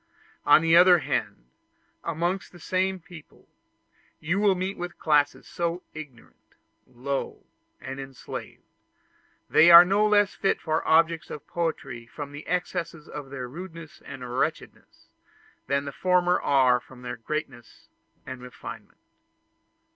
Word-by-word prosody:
On 155 Hz, -, +7 dB
the 165 Hz, 0 st, +4 dB
other 180 Hz, +1 st, +8 dB
hand, -, -, -3 dB, 0.6 s
amongst 170 Hz, +3 st, -2 dB
the 175 Hz, -, -15 dB
same 185 Hz, +2 st, -1 dB
people, 175 Hz, -3 st, -15 dB, 0.7 s
you 170 Hz, +6 st, -1 dB
will 205 Hz, -2 st, +3 dB
meet 185 Hz, +2 st, -3 dB
with 175 Hz, 0 st, -6 dB
classes 150 Hz, -2 st, +1 dB
so 170 Hz, +1 st, -3 dB
ignorant, 150 Hz, -7 st, -13 dB, 0.3 s
low, 130 Hz, +2 st, -5 dB, 0.3 s
and 135 Hz, +1 st, -7 dB
enslaved, 135 Hz, -1 st, -8 dB, 0.8 s
that -, -, -27 dB
they 165 Hz, -, +7 dB
are 170 Hz, +1 st, +11 dB
no 200 Hz, +3 st, +3 dB
less 205 Hz, -1 st, +3 dB
fit 195 Hz, -, 0 dB
objects 160 Hz, +1 st, +2 dB
for -, -, -6 dB
poetry 150 Hz, -7 st, -4 dB
from 145 Hz, +3 st, -8 dB
the 145 Hz, +2 st, -10 dB
excess 180 Hz, -1 st, -2 dB
of 150 Hz, -3 st, -9 dB
their 130 Hz, -2 st, -6 dB
rudeness 165 Hz, +2 st, -10 dB
and 125 Hz, -2 st, -8 dB
wretchedness, -, -, -4 dB, 0.6 s
than 140 Hz, +1 st, 0 dB
the 140 Hz, -, -5 dB
former 180 Hz, +2 st, +2 dB
are 130 Hz, -3 st, +4 dB
from 125 Hz, 0 st, -16 dB
their 125 Hz, -1 st, -5 dB
greatness 120 Hz, -1 st, -6 dB, 0.4 s
and 130 Hz, -1 st, -8 dB
refinement. 125 Hz, 0 st, -10 dB
160 Hz, 130 wpm, -26 LUFS, 135-180 Hz, 0.8 s, are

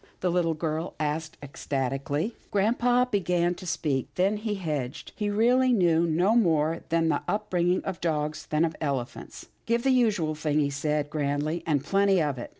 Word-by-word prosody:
the 180 Hz, -, +1 dB
little 170 Hz, -2 st, +1 dB
girl 160 Hz, +1 st, -3 dB
asked 155 Hz, +1 st, -2 dB
ecstatically. 140 Hz, -, -2 dB
Grampa 245 Hz, +5 st, +2 dB
began 175 Hz, -3 st, +1 dB
to 180 Hz, +1 st, -10 dB
speak, 135 Hz, -5 st, -1 dB
then 195 Hz, +3 st, +2 dB
he 210 Hz, 0 st, -3 dB
hedged. 150 Hz, -9 st, -4 dB
He 210 Hz, -2 st, -2 dB
really 245 Hz, +5 st, +3 dB
knew 170 Hz, -5 st, +3 dB
no 175 Hz, +7 st, +2 dB
more 160 Hz, -8 st, +3 dB
about 165 Hz, -, -10 dB
the 165 Hz, 0 st, +1 dB
up 210 Hz, -, -3 dB
bringing 180 Hz, 0 st, +1 dB
of 190 Hz, -2 st, -5 dB
dogs 155 Hz, -2 st, -2 dB
than 155 Hz, +2 st, +2 dB
of 160 Hz, -1 st, -3 dB
elephants. 135 Hz, -5 st, -4 dB
" -, -, -41 dB
Give 235 Hz, +1 st, +1 dB
the 270 Hz, -, +3 dB
usual 210 Hz, -11 st, +2 dB
thing," 150 Hz, -1 st, -1 dB
he 140 Hz, -1 st, +1 dB
said 150 Hz, +1 st, -1 dB
grandly, 150 Hz, +2 st, -1 dB
" -, -, -17 dB
and 145 Hz, -4 st, +1 dB
plenty 195 Hz, +3 st, +3 dB
of 145 Hz, -5 st, -1 dB
it." -, -, -7 dB
165 Hz, 185 wpm, -27 LUFS, 150-195 Hz, -, really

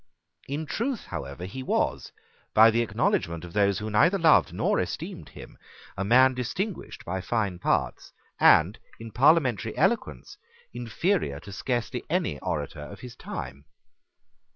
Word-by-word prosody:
In 145 Hz, +3 st, -3 dB
truth 235 Hz, -, -3 dB
however 70 Hz, +6 st, -6 dB
he 115 Hz, +8 st, -7 dB
was, 130 Hz, -, -1 dB, 0.4 s
by 110 Hz, +1 st, +8 dB
the 115 Hz, +1 st, +1 dB
acknowledgment 85 Hz, -6 st, -1 dB
of 85 Hz, -, -11 dB
those 100 Hz, -1 st, +2 dB
who 110 Hz, 0 st, -5 dB
neither 170 Hz, -, +4 dB
loved 165 Hz, -4 st, +4 dB
nor -, -, 0 dB
esteemed -, -, -5 dB
him, -, -, -13 dB, 0.4 s
a 100 Hz, -, -2 dB
man 130 Hz, +5 st, +5 dB
distinguished 180 Hz, -, -4 dB
by 95 Hz, +2 st, -3 dB
fine 100 Hz, -4 st, -2 dB
parts, -, -, -1 dB, 0.3 s
and 90 Hz, +8 st, +5 dB, 0.2 s
in 115 Hz, 0 st, -9 dB
parliamentary 135 Hz, -, +2 dB
eloquence -, -, -1 dB, 0.4 s
inferior 120 Hz, -, -1 dB
to 100 Hz, -, -11 dB
scarcely 120 Hz, +4 st, -3 dB
any 165 Hz, -, -1 dB
orator 75 Hz, +2 st, -4 dB
of 100 Hz, +7 st, -10 dB
his 125 Hz, -2 st, -10 dB
time. 70 Hz, +3 st, -7 dB
115 Hz, 140 wpm, -26 LUFS, 95-130 Hz, 0.4 s, by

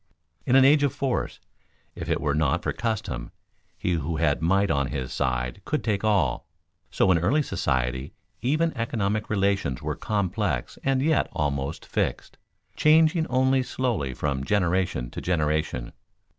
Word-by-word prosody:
In 125 Hz, -, +4 dB
an 135 Hz, 0 st, +7 dB
age 145 Hz, +2 st, +6 dB
of 145 Hz, -3 st, +1 dB
force 135 Hz, -3 st, -2 dB, 0.5 s
if -, -, -7 dB
it -, -, +1 dB
were 75 Hz, -, 0 dB
not 75 Hz, +2 st, +1 dB
for -, -, -1 dB
custom, 105 Hz, -, -3 dB, 0.5 s
he 90 Hz, -, -1 dB
who 80 Hz, -1 st, -1 dB
had 75 Hz, -2 st, +1 dB
might 95 Hz, +4 st, +2 dB
on 70 Hz, -1 st, +1 dB
his 65 Hz, 0 st, -4 dB
side 60 Hz, +7 st, -1 dB
could 150 Hz, -, -2 dB
take 105 Hz, -3 st, -1 dB
all. 105 Hz, -2 st, +1 dB, 0.4 s
So 95 Hz, -, +2 dB
in 85 Hz, -, +4 dB
early 130 Hz, -, +2 dB
society 65 Hz, -, -1 dB, 0.3 s
even 155 Hz, +7 st, +1 dB
economic 110 Hz, -2 st, -1 dB
relations 100 Hz, -10 st, 0 dB
were -, -, -3 dB
complex 100 Hz, -, -2 dB
and 135 Hz, -1 st, +1 dB
yet 155 Hz, -1 st, +2 dB
almost 70 Hz, +1 st, -2 dB
fixed -, -, -3 dB, 0.4 s
changing 160 Hz, +1 st, +4 dB
only 130 Hz, +1 st, +2 dB
slowly 115 Hz, -, -2 dB
from 70 Hz, -1 st, -2 dB
generation 90 Hz, -8 st, 0 dB
to -, -, -6 dB
generation. 75 Hz, -7 st, -1 dB
95 Hz, 150 wpm, -25 LUFS, -, 0.5 s, an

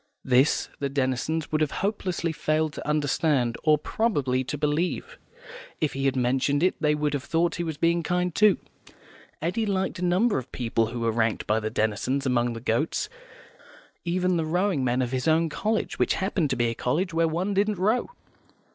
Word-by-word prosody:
This 130 Hz, +3 st, +3 dB
the 140 Hz, -, -1 dB
Denisons 140 Hz, +4 st, -1 dB
would 155 Hz, 0 st, +1 dB
have 155 Hz, -, +2 dB, 0.2 s
hopelessly 185 Hz, -5 st, -1 dB
failed 155 Hz, 0 st, 0 dB
to -, -, -7 dB
understand, 145 Hz, -4 st, +1 dB
or, 155 Hz, -1 st, +5 dB
probably, 145 Hz, -, 0 dB
to 150 Hz, +3 st, -4 dB
believe; 165 Hz, -, -1 dB, 0.6 s
if 155 Hz, -, 0 dB
he 135 Hz, 0 st, -2 dB
had 135 Hz, -, +2 dB
mentioned 135 Hz, +4 st, +1 dB
it 185 Hz, -, +4 dB
they 150 Hz, -1 st, +3 dB
would 150 Hz, 0 st, -1 dB
have 140 Hz, -2 st, -2 dB
thought 170 Hz, +2 st, +1 dB
he 175 Hz, -, -1 dB
was 160 Hz, -3 st, -4 dB
being 170 Hz, +2 st, +2 dB
kind, 180 Hz, 0 st, -1 dB
too. 210 Hz, +1 st, +5 dB, 0.9 s
Eddy 185 Hz, +7 st, 0 dB
liked 190 Hz, -2 st, -1 dB
a -, -, -3 dB
number 185 Hz, -, +2 dB
of 125 Hz, -, -11 dB
people 115 Hz, -2 st, 0 dB
who 120 Hz, +1 st, -5 dB
were 115 Hz, 0 st, +1 dB
ranked 110 Hz, 0 st, 0 dB
by 110 Hz, +1 st, +2 dB
the 110 Hz, 0 st, -3 dB
Denisons 110 Hz, +6 st, -1 dB
among 120 Hz, -2 st, +1 dB
the 115 Hz, -, -6 dB
goats; 120 Hz, -, -1 dB, 0.9 s
even 180 Hz, +1 st, +1 dB
the 165 Hz, -, 0 dB
rowing 180 Hz, -3 st, +1 dB
men 125 Hz, +1 st, +1 dB
of 125 Hz, -, -3 dB
his 130 Hz, +3 st, -1 dB
own 160 Hz, +1 st, +3 dB
college, 215 Hz, +7 st, -2 dB
which -, -, +2 dB
happened 190 Hz, -5 st, 0 dB
to 130 Hz, -, 0 dB
be 120 Hz, -1 st, +1 dB
a -, -, -3 dB
college 165 Hz, +10 st, -1 dB
where 165 Hz, 0 st, +2 dB
one 180 Hz, +5 st, -1 dB
didn't 205 Hz, +1 st, +1 dB
row. 215 Hz, +7 st, +1 dB
155 Hz, 190 wpm, -26 LUFS, 130-180 Hz, 0.9 s, or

